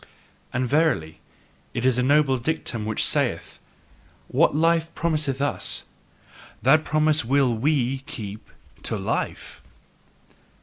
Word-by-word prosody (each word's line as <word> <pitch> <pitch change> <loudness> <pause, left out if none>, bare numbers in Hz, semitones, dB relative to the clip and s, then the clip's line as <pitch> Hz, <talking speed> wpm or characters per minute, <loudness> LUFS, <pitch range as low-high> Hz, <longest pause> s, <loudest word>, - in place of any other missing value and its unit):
And 130 0 -1
verily, 140 - +1 0.6
it 120 - -1
is 130 -1 +3
a - - +3
noble 135 0 +3
dictum 120 -5 -2
which 110 - 0
saith: - - -1 0.7
"What - - +3
life 165 +1 +2
promiseth 155 -5 -1
US, 145 +1 -1 0.8
that 155 +6 +5
promise 155 -1 +2
will 130 +1 +2
WE 135 +1 +1
keep 105 -2 -8 0.3
to - - -2
life!" - - -3
135 Hz, 115 wpm, -24 LUFS, 120-155 Hz, 0.8 s, that